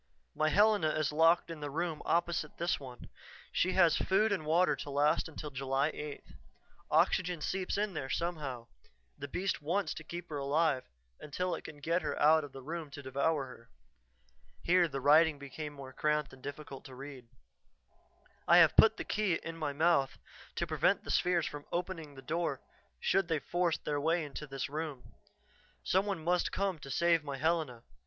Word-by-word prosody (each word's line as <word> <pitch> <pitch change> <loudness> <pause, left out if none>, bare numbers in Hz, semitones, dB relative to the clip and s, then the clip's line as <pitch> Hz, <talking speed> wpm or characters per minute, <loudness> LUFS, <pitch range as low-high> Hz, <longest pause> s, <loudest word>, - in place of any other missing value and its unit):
"My 155 - +1
Helena 205 -4 +4
is 155 -1 0
locked 165 +2 +3
in 165 - -7
the 145 -1 -4
room 160 +1 -2
opposite 170 -3 0
this 170 +2 0
one. 125 -3 -10 0.4
She 185 - +1
has 175 -4 +5
food 210 +3 +2
and 160 -6 -2
water 175 +4 +3
to - - -7
last 145 +3 +2
until 150 -1 -7
July 135 +2 0
8th. 150 -1 -8 0.6
Oxygen 180 -2 +2
seeps 185 +5 -2
in 205 -1 -1
there 135 -4 -4
somehow 145 -9 -3 0.5
the 145 -1 -7
beast 185 +4 -2
wants 180 +7 -1
to 155 - -8
keep 175 +2 -7
her 150 -2 -4
alive 140 -1 +1 0.3
until 180 +5 -3
it - - -5
can 150 - -9
get 165 +5 0
her - - -3
out 155 +1 +5
of 145 - -8
the 135 -1 -10
room 160 +1 -5
to 145 0 -9
devour 140 +2 0
her." 115 -2 -13 0.9
Here 175 0 +4
the 135 - -4
writing 150 +3 +5
became 145 +2 -7
more 135 -2 -10
cramped 150 0 0
and 130 - -14
difficult 145 -1 -8
to 130 - -10
read. 135 -2 -9 1.2
"I 170 - +7
have 165 -3 +7
put 220 0 +6
the - - -3
key 210 -5 0
in 165 0 -6
my 155 -3 -2
mouth 140 -3 +2 0.4
to - - -1
prevent - - +1
the - - -4
spheres 175 -3 +2
from 145 -1 -7
opening 170 -5 -4
the 135 - -11
door 165 +5 -1 0.4
should 195 - +1
they 165 -2 +1
force 175 +3 0
their 145 -1 -2
way 165 +1 +1
into 150 +1 -7
this 135 -1 -4
room. 150 -3 -6 0.7
Some 190 +3 +2
one 190 -6 -3
must 175 +2 +1
come 195 -4 -1
to 140 - -10
save 165 +3 +2
my 140 -2 -5
Helena. 155 -6 -1
155 Hz, 185 wpm, -32 LUFS, 140-175 Hz, 1.2 s, I